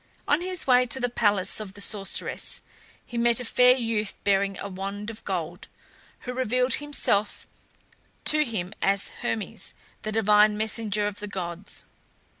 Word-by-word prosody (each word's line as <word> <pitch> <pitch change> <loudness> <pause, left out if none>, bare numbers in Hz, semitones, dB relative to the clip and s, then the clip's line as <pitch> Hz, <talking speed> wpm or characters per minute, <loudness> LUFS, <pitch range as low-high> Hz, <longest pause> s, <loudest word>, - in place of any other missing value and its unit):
On 295 +3 +3
his 365 -1 -1
way 250 -1 +5
to 250 +3 -2
the 245 -1 0
palace 205 -5 +1
of 205 -2 -7
the - - -8
sorceress 200 -1 0 0.4
he 240 - -4
met 235 0 +3
a 250 - -3
fair 250 +2 +5
youth 225 -4 -1
bearing 195 -1 +2
a - - -5
wand 200 +3 -5
of 220 - -13
gold, 175 -1 -4 0.5
who 250 - -5
revealed 250 0 +1
himself 215 -8 0 0.8
to 305 0 +6
him 210 -8 -4
as 195 0 +2
Hermes, 220 -2 -2 0.3
the 215 - -4
divine 210 -1 +4
messenger 215 -1 0
of 205 -1 -3
the 210 - -5
gods. 180 -1 -5
210 Hz, 155 wpm, -26 LUFS, 200-245 Hz, 0.8 s, to